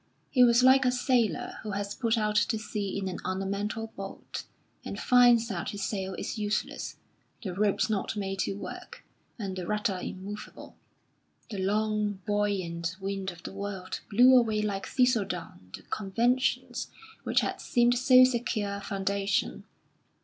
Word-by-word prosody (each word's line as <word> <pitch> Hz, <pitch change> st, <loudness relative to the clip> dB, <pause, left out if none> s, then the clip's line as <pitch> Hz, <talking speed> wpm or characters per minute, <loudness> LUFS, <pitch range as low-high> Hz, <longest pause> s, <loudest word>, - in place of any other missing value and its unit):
He 250 Hz, -, +6 dB
was 240 Hz, 0 st, +5 dB
like 260 Hz, +1 st, +7 dB
a 250 Hz, -, +3 dB
sailor 245 Hz, -, 0 dB
who 210 Hz, -2 st, -5 dB
has 200 Hz, 0 st, -3 dB
put 230 Hz, 0 st, 0 dB
out 210 Hz, -1 st, 0 dB
to 220 Hz, -, +2 dB
sea 210 Hz, -2 st, -3 dB
in 195 Hz, -1 st, -2 dB
an 185 Hz, -, -4 dB
ornamental 200 Hz, +4 st, -3 dB
boat, 195 Hz, 0 st, -7 dB, 0.4 s
and -, -, -6 dB
finds 245 Hz, -2 st, +5 dB
that 175 Hz, -5 st, -3 dB
his 200 Hz, -1 st, -5 dB
sail 190 Hz, -2 st, -3 dB
is 220 Hz, -, -4 dB
useless, 210 Hz, 0 st, -2 dB, 0.5 s
the 190 Hz, -4 st, -3 dB
ropes 200 Hz, +2 st, +1 dB
not 215 Hz, -1 st, -1 dB
made 195 Hz, -1 st, -3 dB
to -, -, 0 dB
work, -, -, -9 dB, 0.3 s
and 195 Hz, -5 st, -4 dB
the 185 Hz, -2 st, -5 dB
rudder 210 Hz, -3 st, 0 dB
immovable. 200 Hz, +2 st, -8 dB, 0.8 s
The 200 Hz, -, -4 dB
long, 210 Hz, +1 st, +1 dB
buoyant 185 Hz, -5 st, -1 dB
wind 195 Hz, 0 st, -3 dB
of 170 Hz, -2 st, -11 dB
the -, -, -7 dB
world 195 Hz, -2 st, -5 dB
blew 250 Hz, +5 st, +7 dB
away 220 Hz, -4 st, +3 dB
like 200 Hz, -2 st, -2 dB
thistle 250 Hz, -4 st, +3 dB
down 165 Hz, -, -7 dB
the -, -, -14 dB
conventions 235 Hz, +6 st, 0 dB, 0.3 s
which -, -, +2 dB
had -, -, -3 dB
seemed 240 Hz, 0 st, +3 dB
so 255 Hz, +1 st, +7 dB
secure 230 Hz, -5 st, 0 dB
a -, -, -8 dB
foundation. 195 Hz, -, -1 dB
205 Hz, 155 wpm, -29 LUFS, 195-230 Hz, 0.8 s, like